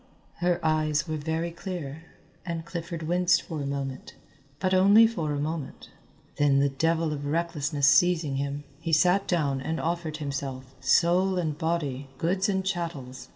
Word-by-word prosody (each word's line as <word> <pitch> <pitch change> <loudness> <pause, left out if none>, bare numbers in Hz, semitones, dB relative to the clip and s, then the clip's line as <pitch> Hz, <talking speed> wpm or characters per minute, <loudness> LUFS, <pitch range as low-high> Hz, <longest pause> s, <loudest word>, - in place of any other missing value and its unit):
Her 175 -1 +1
eyes 155 0 +1
were 155 - -2
very 160 +3 -2
clear, 165 -4 -6 0.4
and 165 -1 -4
Clifford 170 -1 -5
winced 175 +2 +2
for 160 -3 -5
a 140 - -3
moment, 135 -2 -5 0.4
but 185 0 0
only 200 +4 +7
for 170 -10 -1
a 145 - -1
moment. 155 -1 -5 0.5
Then 145 -1 +3
the 140 0 +3
devil 160 +3 0
of 145 -1 -5
recklessness 150 -2 0
seizing 160 -3 +4
him, 140 +1 -3 0.2
he 165 0 -3
sat 180 +5 +4
down 140 -6 0
and 160 +4 -2
offered 165 -2 -2
himself, 135 -3 -5
soul 175 +7 +3
and 160 -4 -1
body, 150 -5 -2
goods 185 +5 0
and 190 -1 0
chattels. 160 -9 -4
160 Hz, 155 wpm, -27 LUFS, 145-175 Hz, 0.5 s, only